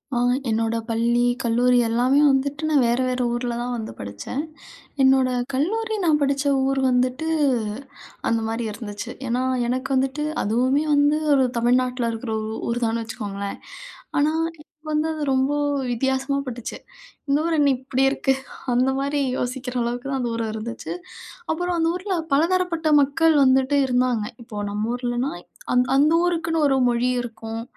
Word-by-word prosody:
அ -, -, +1 dB, 0.3 s
என்னோட 225 Hz, +1 st, 0 dB
பள்ளி, 235 Hz, +1 st, +2 dB, 0.2 s
கல்லூரி 245 Hz, +1 st, +3 dB
எல்லாமே 245 Hz, +5 st, +3 dB
வந்துட்டு 280 Hz, +2 st, -1 dB
நான் 290 Hz, -4 st, +4 dB
வேற, 240 Hz, +2 st, +1 dB
வேற 255 Hz, 0 st, -1 dB
ஊரில 240 Hz, 0 st, -2 dB
தான் 245 Hz, +1 st, -3 dB
வந்து 220 Hz, -1 st, -5 dB
படிச்சேன். 100 Hz, -, -5 dB, 0.6 s
என்னோட 265 Hz, -1 st, +5 dB, 0.3 s
கல்லூரி 440 Hz, -, 0 dB
நான் 310 Hz, -3 st, +4 dB
படிச்ச 280 Hz, 0 st, +1 dB, 0.2 s
ஊர் 270 Hz, 0 st, +1 dB
வந்துட்டு 255 Hz, +4 st, 0 dB, 1.0 s
அந்த 230 Hz, 0 st, +1 dB
மாரி 225 Hz, +1 st, -2 dB
இருந்துச்சு. 205 Hz, -1 st, -7 dB, 0.2 s
ஏன்னா, 245 Hz, +2 st, 0 dB, 0.3 s
எனக்கு 255 Hz, +2 st, -2 dB
வந்துட்டு 270 Hz, +3 st, 0 dB, 0.2 s
அதுவுமே 255 Hz, +7 st, +2 dB
வந்து 290 Hz, +1 st, +3 dB, 0.2 s
ஒரு 265 Hz, -1 st, +4 dB
தமிழ்நாட்டுல 250 Hz, 0 st, +1 dB
இருக்கிற, 225 Hz, 0 st, -5 dB, 0.2 s
ஊ -, -, -5 dB, 0.2 s
ஊர்தான்னு 230 Hz, -1 st, 0 dB
வச்சுக்கோங்களேன். 200 Hz, -3 st, -5 dB, 0.6 s
ஆனா, 295 Hz, +2 st, +3 dB, 0.3 s
இப்ப 310 Hz, +1 st, -26 dB
வந்து 305 Hz, +1 st, +1 dB
அது 310 Hz, -, -5 dB
ரொம்ப 265 Hz, +2 st, +2 dB, 0.4 s
வித்தியாசமா 265 Hz, +3 st, 0 dB
பட்டுச்சு. 240 Hz, -2 st, -6 dB, 0.5 s
இந்த 280 Hz, +1 st, +3 dB
ஊர் 335 Hz, -1 st, +1 dB
என்ன 285 Hz, -2 st, +4 dB
இப்படி 265 Hz, +1 st, 0 dB
இருக்கு, 270 Hz, -1 st, +1 dB, 0.4 s
அந்த 255 Hz, +2 st, +3 dB
மாதிரி 285 Hz, +1 st, -1 dB, 0.2 s
யோசிக்கிற 250 Hz, 0 st, -3 dB
அளவுக்கு 240 Hz, +2 st, -3 dB
தான் 270 Hz, -1 st, -1 dB
அந்த 240 Hz, -1 st, -1 dB
ஊரும் 225 Hz, -1 st, -2 dB
இருந்துச்சு. 230 Hz, +2 st, -5 dB, 0.6 s
அப்புறம் 355 Hz, +2 st, -1 dB
அந்த 325 Hz, 0 st, +2 dB
ஊருல 375 Hz, +1 st, -2 dB, 0.2 s
பலதரப்பட்ட 335 Hz, +1 st, +1 dB
மக்கள் 315 Hz, +3 st, +3 dB
வந்துட்டு 265 Hz, +2 st, +3 dB
இருந்தாங்க. 250 Hz, -3 st, +1 dB, 0.2 s
இப்போ 210 Hz, -3 st, -6 dB
நம்ம 210 Hz, +2 st, -2 dB
ஊர்லனா, 245 Hz, +2 st, -2 dB, 0.4 s
அந் 250 Hz, 0 st, +4 dB
அந்த 300 Hz, +3 st, +4 dB
ஊருக்குன்னு 330 Hz, -2 st, 0 dB
ஒரு 270 Hz, -1 st, +2 dB
மொழி 240 Hz, +1 st, +1 dB
இருக்கும். 225 Hz, -1 st, -6 dB
255 Hz, 150 wpm, -23 LUFS, 235-285 Hz, 1.0 s, என்னோட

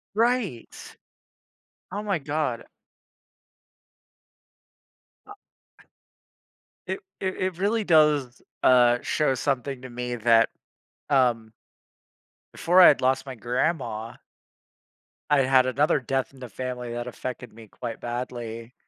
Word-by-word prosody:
Right. 230 Hz, -, 0 dB, 1.2 s
Oh 205 Hz, +3 st, -4 dB
my 195 Hz, -5 st, -1 dB
god. 145 Hz, -4 st, -2 dB, 2.6 s
Uh 415 Hz, -, -10 dB, 0.5 s
eh -, -, -31 dB, 1.0 s
It 385 Hz, -, -3 dB, 0.2 s
it 190 Hz, -1 st, -2 dB
it 185 Hz, -2 st, -2 dB
really 210 Hz, +4 st, 0 dB
does, 150 Hz, -7 st, +3 dB, 0.2 s
uh, 120 Hz, -1 st, +5 dB
show 150 Hz, -3 st, +1 dB
something 135 Hz, -1 st, -2 dB
to 130 Hz, -, -9 dB
me 125 Hz, 0 st, -4 dB
that, 115 Hz, 0 st, +4 dB, 0.6 s
um 120 Hz, -5 st, +2 dB, 1.0 s
before 180 Hz, +2 st, +3 dB
I'd 175 Hz, -6 st, +8 dB
lost 130 Hz, +1 st, +1 dB
my 130 Hz, -2 st, -7 dB
grandma 120 Hz, -2 st, -2 dB, 1.2 s
I 145 Hz, -2 st, +5 dB
had 130 Hz, -1 st, +4 dB
another 140 Hz, +3 st, +2 dB
death 135 Hz, +1 st, -2 dB
in 135 Hz, -, -17 dB
the 125 Hz, -2 st, -8 dB
family 125 Hz, +2 st, -5 dB
that 120 Hz, +1 st, -4 dB
affected 125 Hz, -1 st, -7 dB
me 110 Hz, 0 st, -14 dB
quite 115 Hz, +2 st, -7 dB
badly, 120 Hz, -1 st, -6 dB
130 Hz, 110 wpm, -25 LUFS, 120-150 Hz, 2.6 s, I'd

